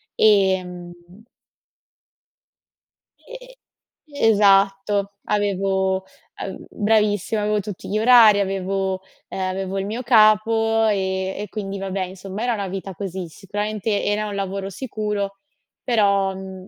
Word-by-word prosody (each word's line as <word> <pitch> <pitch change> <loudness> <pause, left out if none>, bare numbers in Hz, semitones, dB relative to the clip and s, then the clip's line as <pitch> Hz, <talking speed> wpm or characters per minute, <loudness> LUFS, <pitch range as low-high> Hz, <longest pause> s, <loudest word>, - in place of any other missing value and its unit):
Ehm 185 -4 +2 2.3
E - - -12 0.7
esatto, 200 -1 +3
avevo 190 -2 0 0.3
av - - -6
bravissima, 210 0 +1
avevo 210 0 +1
tutti 200 -1 -7
gli 210 - 0
orari, 220 -2 +7
avevo, 190 -1 -2 0.3
ehm - - -6
avevo 190 +1 -3
il 195 - -3
mio 225 +5 -4
capo 225 -1 +4
e 190 -2 -1
e 210 - -5
quindi 200 -1 -5
vabbè, 195 0 -3
insomma, 190 +3 -7
era 245 -1 +1
una 200 -3 -3
vita 195 +1 -6
così. 185 0 -5
Sicuramente 205 +3 -3
era 210 +1 0
un 205 - -5
lavoro 195 0 -3
sicuro, 210 -3 -4 0.5
però, 200 -5 +2
mhmm, 190 0 -9
200 Hz, 115 wpm, -22 LUFS, 190-215 Hz, 2.3 s, orari